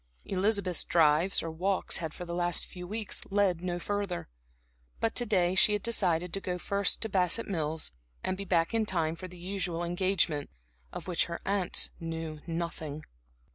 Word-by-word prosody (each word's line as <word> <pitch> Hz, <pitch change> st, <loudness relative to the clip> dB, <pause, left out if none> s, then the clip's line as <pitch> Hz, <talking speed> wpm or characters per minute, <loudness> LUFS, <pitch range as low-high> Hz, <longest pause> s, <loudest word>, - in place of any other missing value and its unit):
Elizabeth's 195 Hz, -2 st, +1 dB
drives, 165 Hz, +3 st, +4 dB
or 165 Hz, -, -3 dB
walks 185 Hz, +4 st, 0 dB
had 160 Hz, -3 st, -3 dB
for 180 Hz, -, -7 dB
the 170 Hz, -, -5 dB
last 175 Hz, 0 st, +2 dB
few 180 Hz, -1 st, -8 dB
weeks 215 Hz, +1 st, -3 dB
led 195 Hz, -4 st, +2 dB
no 180 Hz, -1 st, -1 dB
further. 200 Hz, -, -2 dB, 0.7 s
But 225 Hz, -, +1 dB
to 240 Hz, -, +1 dB
day 180 Hz, -4 st, +3 dB
she 200 Hz, +3 st, +5 dB
had 210 Hz, -, -1 dB
decided 180 Hz, -7 st, +1 dB
to 195 Hz, -, -2 dB
go 180 Hz, -1 st, -2 dB
first 200 Hz, +3 st, +1 dB
to -, -, 0 dB
Bassett 190 Hz, +3 st, +2 dB
Mills, 160 Hz, -4 st, -1 dB, 0.3 s
and 185 Hz, -, 0 dB
be 200 Hz, -, -4 dB
back 170 Hz, 0 st, +2 dB
in 225 Hz, -1 st, +2 dB
time 165 Hz, -4 st, +1 dB
for 185 Hz, +2 st, -7 dB
the 180 Hz, 0 st, -12 dB
usual 180 Hz, -2 st, -2 dB
engagement, 175 Hz, -4 st, +1 dB, 0.4 s
of -, -, -7 dB
which 175 Hz, -3 st, +2 dB
her 170 Hz, -, -5 dB
aunts 195 Hz, -2 st, +1 dB
knew 165 Hz, -2 st, -4 dB
nothing. 165 Hz, -3 st, -3 dB
180 Hz, 175 wpm, -30 LUFS, 165-195 Hz, 0.7 s, she